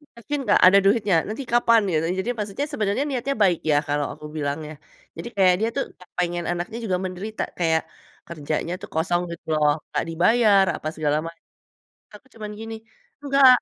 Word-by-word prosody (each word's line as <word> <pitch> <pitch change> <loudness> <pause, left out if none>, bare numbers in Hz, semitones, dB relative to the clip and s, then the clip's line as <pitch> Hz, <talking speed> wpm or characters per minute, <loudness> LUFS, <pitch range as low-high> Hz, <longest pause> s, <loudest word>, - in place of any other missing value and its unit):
yakin 235 +6 -4
nggak, - - +5
ada 190 +2 +7
duitnya? 200 -2 +3
Nanti 220 +6 -4
kapan?" 230 -1 +5
Gitu, 160 -1 +1 0.2
jadi 240 - -4
maksudnya 210 +6 -3
sebenarnya 210 +1 0
niatnya 275 +1 -2
baik 180 -4 +3
ya - - +4
kalau 145 0 0
aku - - -12
bilang 145 0 -2
ya. 155 - -8 0.4
Jadi - - -6
kayak 185 -2 +5
dia 220 - +1
tuh 275 - +1
nggak 180 - -18
pengen 175 -1 -1
anaknya 175 +5 -4
juga 185 -5 0
menderita, 190 +4 -4 0.2
kayak 160 -2 +2 0.4
kerjanya 155 +1 -3
tuh 200 - -9
kosong 175 +2 +1
gitu 170 - -9
loh, 150 -1 +4 0.2
nggak - - 0
dibayar 200 +4 +4
apa 155 - -6
segala 150 -1 0
macam. 165 0 -10 0.7
Aku 210 - -33
cuman 215 -1 -7
gini, 225 0 -6 0.5
"Nggak" 275 -1 +5
190 Hz, 180 wpm, -23 LUFS, 165-225 Hz, 0.7 s, ada